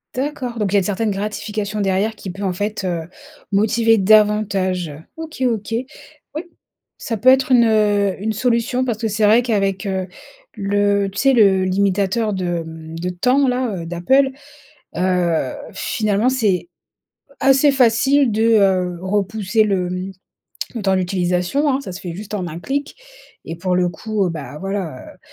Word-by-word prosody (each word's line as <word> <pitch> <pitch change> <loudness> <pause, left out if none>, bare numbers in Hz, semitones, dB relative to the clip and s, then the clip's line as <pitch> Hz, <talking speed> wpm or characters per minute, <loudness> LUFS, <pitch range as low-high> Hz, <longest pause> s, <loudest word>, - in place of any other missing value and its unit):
D'accord 255 -3 -3
donc 205 -3 0
il - - -4
y - - +6
a - - +6
une - - -1
certaine 205 +3 -1
gratification 210 +1 -3
derrière 195 +3 0
qui 200 - -8
peut, 195 +3 -7
en 190 -2 0
fait, 205 +3 -3
heu, 170 -3 -3 0.4
motiver 225 +3 +3
davantage? 195 -4 +2 0.3
OK, 320 -3 -8
OK, 225 -2 -2 0.6
oui, 310 - -3 0.6
ça 225 - -3
peut 255 +6 +4
être 265 +1 +4
une, 240 -2 +6
heu, 205 -3 +2
une 220 +1 -1
solution 245 +2 0
parce 235 -4 -2
que 225 - -1
c'est 215 0 +1
vrai 220 +3 +5
qu'avec, 200 -4 -1
heu, 190 -1 -2 0.5
le 205 -1 +1
tu 195 - -12
sais, 270 +3 +4
le 195 -5 +4
limitateur 200 +3 +1
de, 185 -1 -3
hem, 160 0 -8
de 180 +2 -2
temps, 250 +10 +2
là, 250 -3 0
heu, 170 -2 -6
d'Apple, 265 +12 +2 0.7
heu, 175 -6 +1 0.2
finalement 215 +1 0
c'est 220 - 0 0.7
assez 270 +2 +4
facile 265 +2 +3
de, 220 +1 +1 0.2
heu, 185 -3 +1
repousser 205 +2 0
le 190 -4 0 0.9
le 225 - -3
temps 195 -1 +2
d'utilisation, 180 +8 0
hein. 270 -1 +1
Ça 275 - -8
se 180 - -8
fait 175 -2 -6
juste 210 +4 -8
en 195 -4 -2
un 170 0 -7
clic 280 - -3 0.5
et 165 - -6
pour 180 +2 -1
le 180 0 +2
coup, 195 +2 -2
bah, 150 -3 -7
voilà 195 -7 -4 0.2
heu, - - -25
205 Hz, 170 wpm, -19 LUFS, 185-230 Hz, 0.9 s, y